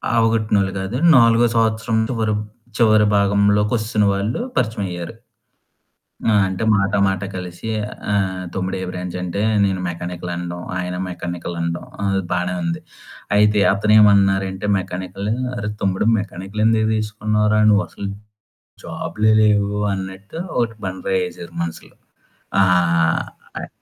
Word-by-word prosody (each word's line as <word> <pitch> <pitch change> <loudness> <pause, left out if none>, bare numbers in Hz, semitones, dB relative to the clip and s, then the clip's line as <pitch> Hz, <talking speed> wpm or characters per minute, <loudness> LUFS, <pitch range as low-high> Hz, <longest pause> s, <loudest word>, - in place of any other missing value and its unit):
అవగొట్టినోళ్ళు 110 -4 +2
కాదు 95 +6 -3 0.2
నాలుగో 115 0 +5
సంవత్సరం 115 0 +1
చివరం 110 -4 0 0.4
చివరి 110 -2 +5
భాగంలోకొస్తున్న 105 +2 +2
వాళ్ళు 100 +4 -2 0.2
పరిచయమైయ్యారు. 100 -8 -2 1.2
ఆ! - - +4
అంటే 95 +2 -4
మాట 100 0 0
మాట 95 0 -1
కలిసి, 90 +3 -6 0.4
ఆహ్, 95 -2 -1
"తమ్ముడు 95 0 -2
ఏ - - -3
బ్రాంచంటే?" 90 +1 -4 0.2
నేను 95 -2 0
మెకానికల్ 90 0 -5
అనడం, 85 0 -5 0.2
ఆయన 90 0 -3
మెకానికల్ 85 -1 -5
అనడం 85 0 -3 0.2
అది 95 -1 +1
బానే 90 0 -1
ఉంది. 85 0 -2 0.6
అయితే 105 0 +4
అతనేమన్నారంటే 100 -2 +3
మెకానికలూ 95 +3 -4 0.2
"అరే 105 -2 -3
తమ్ముడు 95 +1 0
మెకానికలెందుకు 105 +3 0
తీసుకున్నావురా? 105 0 +1
నువ్వు 105 0 +3
అసలు 100 - -7 0.8
జాబులే 110 +1 -1
లేవు," 105 -1 +3 0.2
అన్నట్టు 95 +5 -7 0.2
ఒకటి 115 -2 0
బండరాయి 95 0 -1
వేసారు 90 -1 -9
మనసులో. 85 -1 -6 0.7
ఆ! - - +7 1.0
అయి - - -7
100 Hz, 115 wpm, -20 LUFS, 95-110 Hz, 1.2 s, ఆ